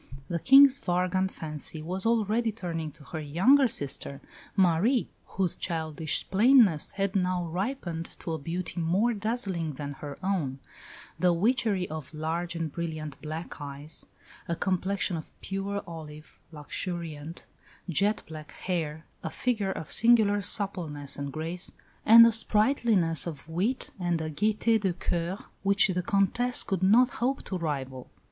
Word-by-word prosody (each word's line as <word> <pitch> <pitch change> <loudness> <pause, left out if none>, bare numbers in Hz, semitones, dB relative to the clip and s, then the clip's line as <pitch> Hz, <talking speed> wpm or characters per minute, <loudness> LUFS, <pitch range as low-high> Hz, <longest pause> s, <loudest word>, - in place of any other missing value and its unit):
The 170 - -1
King's 275 - +7
vagrant 180 +1 0
fancy 155 -2 -4
was 185 +5 -1
already 225 0 +1
turning 170 -7 -4
to 145 - -14
her 160 +4 -6
younger 190 - +4
sister, 140 - -3 0.4
Marie, 195 +7 +3 0.2
whose 185 -3 -1
childish 160 -2 -2
plainness 210 - +5
had 195 0 -1
now 180 -2 +1
ripened 175 -2 -4
to 165 - -3
a 160 - -3
beauty 175 +4 -4
more 195 +9 +2
dazzling 200 -7 -2
than 145 +1 -6
her 140 0 -8
own 170 -9 -1 0.6
the 180 -1 +4
witchery 210 -1 +1
of 155 -1 -7
large 165 +3 -3
and 165 -2 -3
brilliant 155 -3 -5
black 155 +1 -6
eyes, 145 +2 -6 0.4
a 170 - -1
complexion 190 0 -1
of 155 - -8
pure 195 +1 -3
olive, 155 -2 -10
luxuriant, 160 0 -6 0.4
jet 200 +5 +1
black 155 -1 -9
hair, 160 -4 -3 0.2
a 160 - -4
figure 215 -1 -1
of 160 - -6
singular 220 -3 +4
suppleness 170 -9 0
and 140 -1 -5
grace, 165 +5 -5 0.4
and 230 +1 +10
a 230 - +5
sprightliness 215 - +2
of 150 -3 -7
wit 190 +11 -1
and 175 -2 0
a 155 0 -3
gaieté 215 +6 +2
de 190 -3 +1
coeur 175 +1 -2 0.2
which 200 0 +4
the 180 -1 0
Comtesse 200 +7 +1
could 190 -2 -2
not 230 +7 +5
hope 260 +3 -2
to 190 - -5
rival. 135 -6 -4
180 Hz, 145 wpm, -28 LUFS, 160-205 Hz, 0.6 s, and